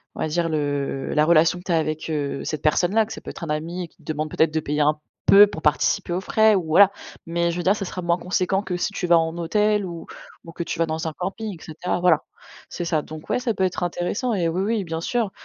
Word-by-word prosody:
on -, -, -10 dB
va -, -, 0 dB
dire 165 Hz, +2 st, 0 dB
le 145 Hz, -3 st, -2 dB
la 150 Hz, -, +4 dB
relation 165 Hz, +1 st, +4 dB
que -, -, -13 dB
tu 185 Hz, -, -2 dB
as 165 Hz, -, +3 dB
avec, 155 Hz, 0 st, -2 dB
heu, 145 Hz, -3 st, -2 dB
cette 155 Hz, -2 st, -4 dB
personne-là. 180 Hz, +8 st, +3 dB
Que 220 Hz, -, -8 dB
ça -, -, -9 dB
peut -, -, -9 dB
être -, -, -9 dB
un -, -, -8 dB
ami 165 Hz, +4 st, -3 dB
et -, -, -7 dB
qui -, -, -33 dB
te -, -, -23 dB
demande 155 Hz, 0 st, -3 dB
peut-être 155 Hz, +1 st, +1 dB
de 160 Hz, -, +1 dB
payer 150 Hz, 0 st, -1 dB
un 150 Hz, +1 st, +2 dB, 0.3 s
peu 205 Hz, +1 st, +8 dB
pour 160 Hz, -5 st, -8 dB
participer 150 Hz, +3 st, +1 dB
aux 180 Hz, -, 0 dB
frais 220 Hz, +2 st, +4 dB
ou 185 Hz, -, 0 dB
voilà, 190 Hz, +5 st, +6 dB, 0.3 s
mais 170 Hz, +1 st, 0 dB
je 170 Hz, -, -5 dB
veux 175 Hz, -, -2 dB
dire 190 Hz, -, +4 dB
ça 200 Hz, -, -4 dB
sera 180 Hz, -, -5 dB
moins 170 Hz, 0 st, +1 dB
conséquent 185 Hz, +2 st, 0 dB
que 190 Hz, -3 st, -3 dB
si 175 Hz, -, -1 dB
tu 185 Hz, -3 st, -3 dB
vas 170 Hz, 0 st, +6 dB
en 165 Hz, 0 st, -1 dB
hôtel 210 Hz, +4 st, +1 dB
ou 170 Hz, -2 st, -7 dB, 0.4 s
ou 165 Hz, -, -10 dB
que 170 Hz, -, -4 dB
tu -, -, -4 dB
vas 165 Hz, -, +2 dB
dans 160 Hz, 0 st, -3 dB
un 160 Hz, -, -4 dB
camping 195 Hz, +5 st, -4 dB
et -, -, -14 dB
cetera, 165 Hz, +3 st, -3 dB
voilà. 175 Hz, -4 st, +4 dB, 0.5 s
C'est 175 Hz, -, -5 dB
ça 160 Hz, -2 st, +1 dB
donc 155 Hz, +1 st, -10 dB
ouais, -, -, +1 dB
ça 245 Hz, -2 st, -1 dB
peut 190 Hz, -, -1 dB
être 185 Hz, -1 st, -1 dB
intéressant 175 Hz, +8 st, -1 dB
et 175 Hz, -5 st, +1 dB
oui, 175 Hz, +3 st, -1 dB
oui, 215 Hz, 0 st, 0 dB
bien 165 Hz, -2 st, -4 dB
sûr. 225 Hz, +4 st, -1 dB
170 Hz, 280 wpm, -23 LUFS, 155-190 Hz, 0.5 s, peu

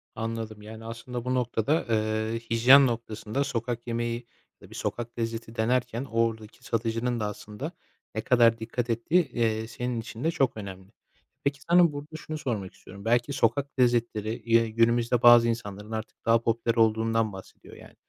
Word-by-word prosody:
Anladım. 115 Hz, -1 st, -4 dB
Yani, 110 Hz, +1 st, -10 dB
aslında 115 Hz, +1 st, -6 dB
bu 130 Hz, 0 st, 0 dB
noktada, 125 Hz, +4 st, 0 dB
ııı, 110 Hz, 0 st, 0 dB
hijyen 125 Hz, +4 st, +6 dB
noktasında 115 Hz, +2 st, -3 dB
sokak 120 Hz, -2 st, -3 dB
yemeği 120 Hz, 0 st, -2 dB, 0.3 s
ya -, -, -13 dB
da -, -, -23 dB
bir -, -, -12 dB
sokak 120 Hz, 0 st, -4 dB
lezzeti 115 Hz, 0 st, -4 dB
denerken 125 Hz, +2 st, 0 dB
oradaki 115 Hz, -2 st, -2 dB
satıcının 115 Hz, +1 st, -1 dB
da 105 Hz, -, -1 dB
aslında 105 Hz, -, -6 dB, 0.4 s
ne 110 Hz, -, -1 dB
kadar 115 Hz, -2 st, +4 dB
dikkat 120 Hz, +2 st, -3 dB
ettiği, 150 Hz, +9 st, +2 dB
eee, 110 Hz, -1 st, 0 dB
senin 120 Hz, 0 st, -3 dB
için 115 Hz, +2 st, -8 dB
de 165 Hz, -, +2 dB
çok 135 Hz, -8 st, 0 dB
önemli. 95 Hz, -2 st, -8 dB, 0.5 s
Peki, 140 Hz, -1 st, -1 dB
sana 175 Hz, -1 st, +6 dB
burada 145 Hz, +2 st, -8 dB
şunu 155 Hz, 0 st, -6 dB
sormak 110 Hz, -10 st, -4 dB
istiyorum: 100 Hz, +2 st, -13 dB
Belki 120 Hz, +4 st, +2 dB
sokak 135 Hz, +3 st, 0 dB
lezzetleri, 120 Hz, -3 st, +2 dB
eee, 115 Hz, 0 st, +3 dB
günümüzde 115 Hz, +1 st, +2 dB
bazı 120 Hz, -1 st, +8 dB
insanların 105 Hz, -2 st, -4 dB
artık 110 Hz, 0 st, -6 dB
daha 115 Hz, 0 st, +4 dB
popüler 115 Hz, 0 st, 0 dB
olduğundan 115 Hz, -1 st, +2 dB
bahsediyor 95 Hz, 0 st, -12 dB
yani. -, -, -15 dB
115 Hz, 165 wpm, -27 LUFS, 110-125 Hz, 0.5 s, bazı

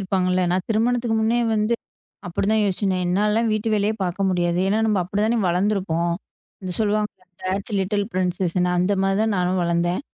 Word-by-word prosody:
இருப்பாங்கல்ல. 185 Hz, -1 st, +1 dB
நான் 180 Hz, +1 st, 0 dB
திருமணத்துக்கு 235 Hz, +1 st, +1 dB
முன்னே 230 Hz, +2 st, +2 dB
வந்து 215 Hz, +2 st, +1 dB, 0.5 s
அப்படி 175 Hz, +2 st, -2 dB
தான் 220 Hz, -, +3 dB
யோசிச்சேன். 195 Hz, 0 st, 0 dB
என்னாலலாம் 210 Hz, +5 st, +1 dB
வீட்டு 215 Hz, +1 st, -1 dB
வேலையே 210 Hz, +1 st, +1 dB
பார்க்க 190 Hz, +2 st, -1 dB
முடியாது. 175 Hz, -1 st, 0 dB
ஏன்னா 210 Hz, -, +2 dB
நம்ப 210 Hz, -2 st, +2 dB
அப்படி 200 Hz, +3 st, -2 dB
தான் 230 Hz, +2 st, +2 dB
வளர்ந்து 190 Hz, +5 st, +2 dB
இருக்கோம். 170 Hz, -3 st, -1 dB, 0.5 s
இந்த 185 Hz, -, -4 dB
சொல்லுவாங்க 210 Hz, 0 st, +1 dB, 0.3 s
டேட்ஸ் 195 Hz, +3 st, -3 dB
லிட்டில் 200 Hz, +2 st, 0 dB
ப்ரின்சஸ்னு 180 Hz, -1 st, 0 dB
அந்த 180 Hz, +3 st, +2 dB
மாதிரி 195 Hz, +1 st, +1 dB
தான் 220 Hz, -1 st, +1 dB
நானும் 180 Hz, +1 st, +1 dB
வளர்ந்தேன். 170 Hz, +1 st, 0 dB
195 Hz, 170 wpm, -22 LUFS, 180-215 Hz, 0.5 s, தான்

